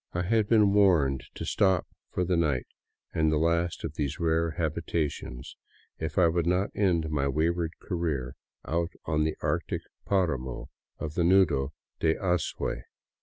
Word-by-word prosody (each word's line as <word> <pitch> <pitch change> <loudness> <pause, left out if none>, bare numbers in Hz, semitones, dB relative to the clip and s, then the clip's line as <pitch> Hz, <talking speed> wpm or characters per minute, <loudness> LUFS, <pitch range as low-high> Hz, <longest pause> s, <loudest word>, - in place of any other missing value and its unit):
I 85 - 0
had 110 +2 +2
been 105 -3 +5
warned 75 -11 +4
to - - -5
stop 95 -3 +2 0.2
for 90 - -1
the 90 0 +1
night 75 -7 +1 0.5
in 80 -1 +2
the 75 - +2
last 85 +2 +1
of 80 - -3
these 75 -1 -2
rare 80 0 +2
habitations, 80 -5 -3 0.4
if 80 -1 -4
I 90 -3 +6
would 85 0 +1
not 90 +3 +1
end 85 -6 +1
my 70 -2 +1
way 80 +4 +2
ward 85 -1 -3
career 80 -9 -2 0.3
out 85 +1 -1
on 75 -1 +1
the 80 - -2
arctic - - -1 0.2
paramo 65 -10 -1 0.3
of 75 - -5
the 85 - +1
Nudo 85 -6 +3 0.3
de 80 0 +2
Azuay. 90 -9 -1
80 Hz, 160 wpm, -28 LUFS, 75-90 Hz, 0.5 s, I